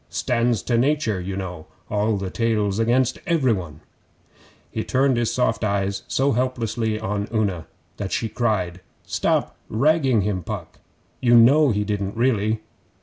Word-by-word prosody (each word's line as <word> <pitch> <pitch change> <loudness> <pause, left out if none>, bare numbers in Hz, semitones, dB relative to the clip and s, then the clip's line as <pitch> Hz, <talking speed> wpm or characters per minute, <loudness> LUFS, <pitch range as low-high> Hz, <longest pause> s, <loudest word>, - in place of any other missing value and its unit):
Stands 115 -5 0
to 120 -2 +1
nature 130 -7 +1
you 95 +2 -4
know 90 -4 -6 0.2
all 105 0 0
the 95 -1 -4
tales 110 -3 0
against 120 +2 +2
every 150 -8 +3
one.' 85 -6 -6 0.9
He 110 - -2
turned 130 0 +2
his 120 -1 0
soft 125 -2 0
eyes 100 -1 0
so 135 +1 +1
helplessly 115 -3 -1
on 105 0 -2
Una 100 -7 -1 0.3
that 100 -2 -4
she 115 - -1
cried, 100 -6 -1 0.2
'Stop - - 0
ragging 135 -1 +3
him, 100 -1 -1
Puck! - - -7 0.4
You 120 -1 +5
know 140 +6 +6
he 105 -3 +1
didn't 100 0 -3
really. 110 -3 +1
110 Hz, 145 wpm, -23 LUFS, 100-125 Hz, 0.9 s, know